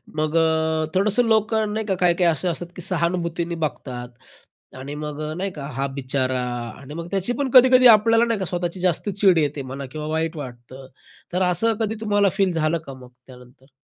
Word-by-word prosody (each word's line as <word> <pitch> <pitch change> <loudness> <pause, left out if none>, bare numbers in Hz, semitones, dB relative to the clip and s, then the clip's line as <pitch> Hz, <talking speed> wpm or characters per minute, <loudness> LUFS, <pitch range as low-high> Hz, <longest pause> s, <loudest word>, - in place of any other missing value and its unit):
मग 155 +1 -1
अ, 160 -1 +1
थोडंसं 205 +5 +3
लोकं 220 -1 +1
नाही 220 0 -2
का 195 -2 0
काही-काही 175 -1 +3
असे 160 +3 -2
असतात, 175 0 -3
की - - -8
सहानुभूतीने 170 -1 -1
बघतात 125 -4 -6 0.7
आणि 140 +3 -7
मग 150 0 -6
अ, - - -4
नाही 190 +4 -3
का 145 -5 -8
हां, 135 +2 -2
बिचारा 130 -1 -1 0.4
आणि 140 +1 -10
मग 170 +1 -6
त्याची 195 +4 -1
पण 270 +2 -2
कधी-कधी 255 0 +8
आपल्याला 225 +2 +3
नाही 230 -3 -1
का 190 - -2
स्वतःची 175 +1 -3
जास्त 180 +3 0
चीड 195 -2 +3
येते 150 -2 0
म्हणा 135 +1 -7
किंवा 150 +1 -5
वाईट 160 +1 -2
वाटतं, 130 -1 -9 0.5
तर 180 - 0
असं 225 +6 +2
कधी 220 0 -1
तुम्हाला 205 -2 +2
फील 195 -3 +2
झालं 160 0 +1
का 135 - -7
मग 130 -1 -13 0.2
त्यानंतर? 125 +1 -17
170 Hz, 190 wpm, -22 LUFS, 145-200 Hz, 0.7 s, कधी-कधी